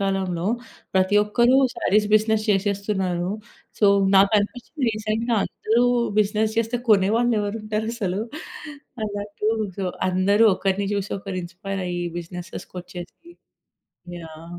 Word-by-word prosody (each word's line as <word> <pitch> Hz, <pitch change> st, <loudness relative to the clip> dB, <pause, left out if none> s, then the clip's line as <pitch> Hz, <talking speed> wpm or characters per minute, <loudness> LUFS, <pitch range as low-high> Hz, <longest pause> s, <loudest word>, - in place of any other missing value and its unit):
కాలంలో. 190 Hz, -3 st, -1 dB, 0.5 s
ప్రతి 190 Hz, +2 st, +3 dB
ఒక్కరూ 240 Hz, +5 st, +3 dB, 0.2 s
సారీస్ 210 Hz, +1 st, +2 dB
బిజినెస్ 215 Hz, 0 st, +3 dB
చేశేస్తున్నారు. 195 Hz, -3 st, 0 dB, 0.5 s
సో 210 Hz, -, +4 dB, 0.3 s
నాకనిపించింది 210 Hz, +8 st, +2 dB
రీసెంట్‌గా 220 Hz, +2 st, -1 dB
అందరూ 230 Hz, +3 st, 0 dB, 0.4 s
బిజినెస్ 215 Hz, +1 st, +1 dB
జేస్తే 230 Hz, +1 st, 0 dB
కొనేవాళ్ళెవరుంటారసలు? 215 Hz, -1 st, +1 dB, 0.8 s
అలా 205 Hz, -1 st, -4 dB
అటు 210 Hz, +1 st, -3 dB, 0.3 s
సో 195 Hz, -, -1 dB, 0.3 s
అందరూ 200 Hz, +4 st, +3 dB
ఒకరిని 195 Hz, +1 st, -1 dB
జూసి 200 Hz, 0 st, -3 dB
ఒకరు 190 Hz, -1 st, -5 dB
ఇన్స్పైర్ 185 Hz, +2 st, -5 dB
అయ్యి 175 Hz, 0 st, -2 dB
బిజినెస్సెస్‌కొచ్చేసి 180 Hz, -, -9 dB, 0.9 s
యాహ్! 165 Hz, +2 st, -10 dB
200 Hz, 100 wpm, -23 LUFS, 185-215 Hz, 0.9 s, సో